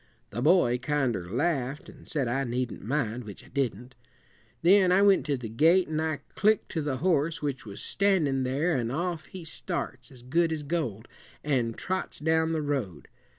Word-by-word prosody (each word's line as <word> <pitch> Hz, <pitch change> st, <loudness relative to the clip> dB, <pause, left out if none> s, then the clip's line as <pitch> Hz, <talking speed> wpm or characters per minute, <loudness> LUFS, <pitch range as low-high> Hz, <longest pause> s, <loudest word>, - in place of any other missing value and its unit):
The 120 Hz, -, -3 dB
boy 130 Hz, -5 st, +4 dB
kinder 125 Hz, -9 st, -1 dB
laughed, 135 Hz, -, -1 dB
and -, -, -14 dB
said 140 Hz, -5 st, 0 dB
I 135 Hz, +3 st, 0 dB
needn't 125 Hz, -2 st, -3 dB
mind, 125 Hz, -1 st, -1 dB
which 105 Hz, -3 st, -10 dB
I -, -, -17 dB
didn't. 125 Hz, -2 st, -2 dB, 0.7 s
Then 185 Hz, +1 st, +6 dB
I 190 Hz, +2 st, +5 dB
went 200 Hz, -5 st, +4 dB
to 140 Hz, -2 st, +1 dB
the 120 Hz, -2 st, -6 dB
gate, 165 Hz, -, +4 dB
and 155 Hz, 0 st, -1 dB
I 155 Hz, -3 st, -2 dB
clicked 215 Hz, +1 st, +2 dB
to 160 Hz, -, -1 dB
the 145 Hz, -3 st, -2 dB
horse 160 Hz, -1 st, +1 dB
which 135 Hz, -5 st, -3 dB
was 100 Hz, 0 st, -7 dB
standin' 175 Hz, -10 st, +2 dB
there, 140 Hz, +7 st, +1 dB
an' 120 Hz, -3 st, -1 dB
off 160 Hz, +2 st, -3 dB
he 180 Hz, -3 st, -9 dB
starts, 155 Hz, -7 st, -5 dB
as 125 Hz, -3 st, -15 dB
good 165 Hz, +6 st, +1 dB
as 155 Hz, -2 st, -3 dB
gold, 135 Hz, -, -3 dB, 0.4 s
an' 125 Hz, -6 st, +1 dB
trots 185 Hz, 0 st, -3 dB
down 160 Hz, +1 st, +1 dB
the 160 Hz, -2 st, -1 dB
road. 125 Hz, -, -3 dB
145 Hz, 185 wpm, -28 LUFS, 125-165 Hz, 0.7 s, Then